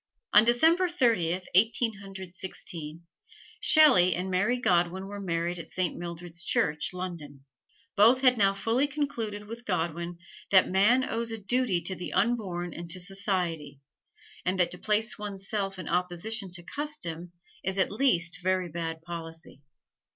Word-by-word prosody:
On 210 - +8
December 325 +10 +4
Thirtieth, 190 - +1
Eighteen 220 +2 +3
Hundred 190 -2 -9
Sixteen, 170 -3 -6 0.5
Shelley 265 - +6
and 185 +1 -3
Mary 205 +7 +1
Godwin 180 -3 +1
were 205 +1 -7
married 170 -1 -2
at 170 - -9
Saint 185 -2 -1
Mildred's 175 0 -7
Church, 150 -3 0
London. 165 -7 -7 0.5
Both 230 +6 +5
had 255 -2 +5
now 195 -3 +3
fully 230 +7 +1
concluded 230 -8 -3
with 230 +3 -9
Godwin 170 -3 -2 0.3
that 190 -1 +6
man 215 +8 +3
owes 230 +1 -2
a 225 - -4
duty 210 -4 0
to 190 - -2
the 180 - -6
unborn 190 -6 0
and 170 0 -8
to 185 - -2
society, 180 -6 -1 0.6
and 185 +1 -1
that 175 -1 +2
to 180 - -8
place 215 +3 0
one's 200 -2 -6
self 195 -3 -2
in 185 - -7
opposition 180 +4 -1
to 175 -1 -6
custom 180 - -5 0.3
is 190 +1 -2
at 190 - +2
least 180 -8 +1
very 185 -1 0
bad 165 0 -5
policy. 165 -3 -9
185 Hz, 150 wpm, -28 LUFS, 175-220 Hz, 0.6 s, On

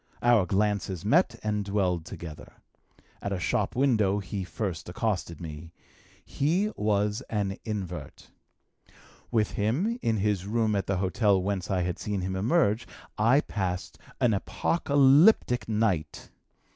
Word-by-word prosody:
Our 120 -6 +4
glances 100 -2 -1
met 120 - +3
and 105 -1 -1
dwelled 95 -5 0
together. 80 -3 -9 0.7
At 100 - -3
a 95 - -1
shop 85 - -1
window 110 -7 +2
he 100 0 -4
first 90 -2 -4
accosted 95 - -2
me. 80 0 -8 0.5
He 180 +9 0
was 105 0 0
an 100 -3 -2
invert. 90 - -6 1.0
With 110 -3 +1
him, 160 - 0
in 115 -1 +1
his 100 -2 0
room 110 -1 +1
at 100 -2 -1
the 95 - 0
hotel 100 +1 +2
whence 95 -1 -2
I 95 -3 +1
had 90 -1 -3
seen 105 -2 -2
him 95 +1 -3
emerge, 115 - +1 0.3
I 120 +7 +5
passed 90 -7 -4 0.2
an 120 -3 +3
apocalyptic 140 - +3
night. 105 -8 -1
105 Hz, 135 wpm, -27 LUFS, 95-115 Hz, 1.0 s, I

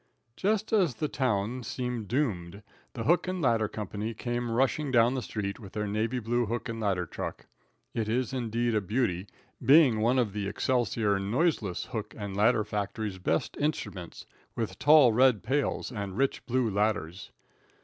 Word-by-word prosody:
Just 215 +2 0
as 180 - +3
the 150 - -1
town 125 -3 -1
seemed 125 -3 -4
doomed, 100 -8 -2 0.3
the 115 - -4
hook 175 +7 +3
and 185 0 -2
ladder 115 -7 +2
company 105 +1 -5
came 120 +1 -3
rushing 135 +5 +1
down 120 -1 +4
the 130 - -2
street 100 -2 -4
with 100 -5 -11
their 105 -1 -2
navy 110 +4 -1
blue 120 0 0
hook 120 +3 -3
and 115 -1 -4
ladder 95 -5 0
truck. - - -6 0.5
It 110 -2 -2
is 125 +3 0
indeed 120 -1 -1
a 105 - +2
beauty, 100 -3 -1 0.4
being 135 -3 +6
one 120 +4 +2
of 115 -6 +1
the 105 -1 -2
Excelsior 110 -3 +1
noiseless 105 - 0
hook 110 -4 -6
and 100 -2 -5
ladder 110 +2 +3
factory's 105 -1 -3
best 80 -3 -1
instruments, 100 - -3 0.3
with 115 -3 -3
tall 145 -6 +7
red 125 -2 +4
pails 135 +5 -1
and 100 -4 -5
rich 135 0 0
blue 125 0 +1
ladders. 100 -4 -1
115 Hz, 165 wpm, -29 LUFS, 105-130 Hz, 0.5 s, tall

